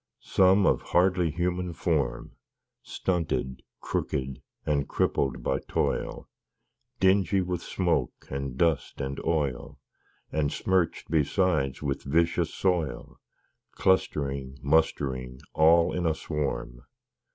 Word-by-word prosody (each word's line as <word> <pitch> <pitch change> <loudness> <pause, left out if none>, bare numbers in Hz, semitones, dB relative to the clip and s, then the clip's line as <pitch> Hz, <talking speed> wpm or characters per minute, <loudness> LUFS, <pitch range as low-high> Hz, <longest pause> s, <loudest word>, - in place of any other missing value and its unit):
Some, 95 +1 +4
of - - +3
hardly 90 -1 +2
human 90 +2 -2
form, - - -1 0.5
Stunted, 85 -7 -2 0.2
crooked, 65 -2 -3 0.2
and 70 -2 0
crippled 65 -2 0
by 65 - 0
toil; - - -1 0.7
Dingy 95 0 +3
with 90 -1 -2
smoke 85 -10 -1
and 70 -1 -4
dust 80 -2 +1
and 70 0 -4
oil, 75 -6 -1 0.5
And 75 -2 0
smirch'd 95 -3 0
besides 75 -3 +1
with 70 -1 -2
vicious 80 +3 +1
soil, 90 -6 -1 0.5
Clustering, 70 -8 0
mustering, 65 -4 0
all 85 +2 +5
in 90 -2 0
a 80 - +1
swarm. 65 -6 -3
80 Hz, 105 wpm, -27 LUFS, 70-90 Hz, 0.7 s, all